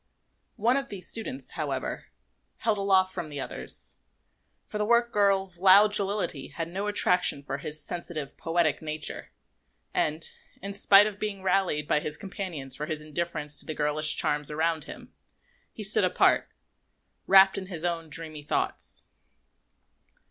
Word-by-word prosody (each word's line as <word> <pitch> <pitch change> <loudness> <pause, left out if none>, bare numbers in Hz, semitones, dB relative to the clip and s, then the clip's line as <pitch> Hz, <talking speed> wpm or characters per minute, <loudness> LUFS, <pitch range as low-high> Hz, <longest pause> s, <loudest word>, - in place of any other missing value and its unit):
One 240 +5 +2
of 275 0 -3
these 185 -4 -5
students, 255 +4 -3
however, - - -4 0.5
held 215 -3 0
aloof 190 -1 +3
from 160 - -5
the 145 -1 -4
others; - - -5 0.7
for 210 - -6
the - - +1
work 235 +1 +3
girls' 195 -3 +2
loud 200 +3 +7
jollity 200 -8 -1
had 165 +3 -5
no 195 +4 -3
attraction 180 -7 +2
for 140 0 -4
his 150 +2 -5
sensitive, 160 -5 -5
poetic 165 -3 0
nature, 155 -1 -4 0.6
and, 155 +2 0 0.3
in 200 +1 -6
spite 200 0 +6
of 210 -1 -4
being 200 -3 -4
rallied 180 -6 +1
by 150 - +3
his 150 0 -4
companions 175 -9 -5
for 150 - -5
his 155 -2 -3
indifference 150 -1 -3
to - - 0
the 155 - -4
girlish 150 +1 +3
charms 150 -1 0
around 160 0 -1
him, - - -11 0.6
he - - -8
stood - - +4
apart, - - +3 0.8
wrapped 190 0 +7
in 190 - -8
his 175 -3 -5
own 165 -2 -2
dreamy 155 -1 -3
thoughts. 145 - -3
175 Hz, 150 wpm, -27 LUFS, 150-200 Hz, 0.8 s, loud